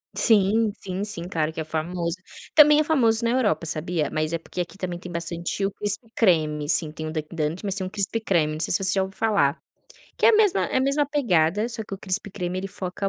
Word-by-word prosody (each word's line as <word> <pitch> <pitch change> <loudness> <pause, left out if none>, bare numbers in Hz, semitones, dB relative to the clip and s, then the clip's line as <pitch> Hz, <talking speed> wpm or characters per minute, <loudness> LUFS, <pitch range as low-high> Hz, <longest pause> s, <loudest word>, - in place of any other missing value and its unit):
Sim, 215 0 +3
sim, 190 +1 -4
sim, 205 -5 -5
claro 160 -3 -1
que 160 - -4
é - - -2
famoso. 170 +2 -3 0.4
Também 300 0 +8
é - - +4
famoso 235 -8 +2
na 230 - +2
Europa, 245 -8 +1
sabia? 155 -1 -2
Mas 155 +1 -1
é 165 - -1
porque 175 - -9
aqui 175 - -6
também 180 -3 -4
tem 180 0 -9
bastante 170 +3 -3
o 195 - -1
Crispy 205 +3 -2
Creme, 155 -7 +2
assim, 155 +1 +1
tem 155 0 -6
o 155 - -4
Dunkin 155 +1 -5
Donuts, 160 +4 -2
mas 195 -2 -2
tem 190 -2 -3
um - - -5
Crispy 205 +3 -2
Creme, 165 -8 +1
não 155 - -5
sei 160 - 0
se 195 +2 +1
você 190 0 +2
já 190 -1 +2
ouviu 190 0 -7
falar. 200 -10 +1 0.6
Que - - +4
é - - +8
a 445 - +6
mesma 415 -3 +3
é - - -2
a - - +3
mesma 275 +2 +1
pegada, 205 - +2
só 230 -2 -5
que 205 -2 -7
o - - -9
Crispy 195 +2 -2
Creme 185 -1 -3
ele 195 - -4
foca 190 +1 -4
185 Hz, 250 wpm, -24 LUFS, 165-215 Hz, 0.6 s, Também